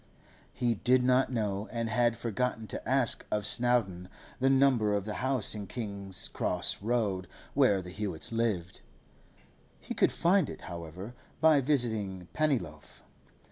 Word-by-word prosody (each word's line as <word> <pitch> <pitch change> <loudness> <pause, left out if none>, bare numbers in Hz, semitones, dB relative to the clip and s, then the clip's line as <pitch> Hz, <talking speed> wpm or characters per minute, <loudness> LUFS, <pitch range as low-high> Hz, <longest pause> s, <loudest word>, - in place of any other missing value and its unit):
He 120 -1 0
did 125 +4 +2
not 130 +1 +3
know, 105 -3 -2
and 115 -1 -2
had 115 0 +1
forgotten 115 0 -2
to - - -4
ask 130 -3 +2
of 105 -1 -1
Snowdon, 105 -6 +2 0.3
the 135 +1 +3
number 130 -6 +3
of 100 -1 -2
the 105 - -4
house 130 -4 +1
in 105 -2 -6
King's 100 -4 -5
Cross - - 0
Road 105 -5 -1 0.3
where 95 -2 +3
the 90 - -9
Hewetts 100 -4 -3
lived. 105 -6 -2 1.0
He - - -6
could - - +2
find 185 +3 +2
it, - - -8
however, 85 +5 -8 0.3
by 155 -3 +5
visiting 110 - 0
Pennyloaf. 105 - -2
110 Hz, 140 wpm, -30 LUFS, 95-125 Hz, 1.0 s, by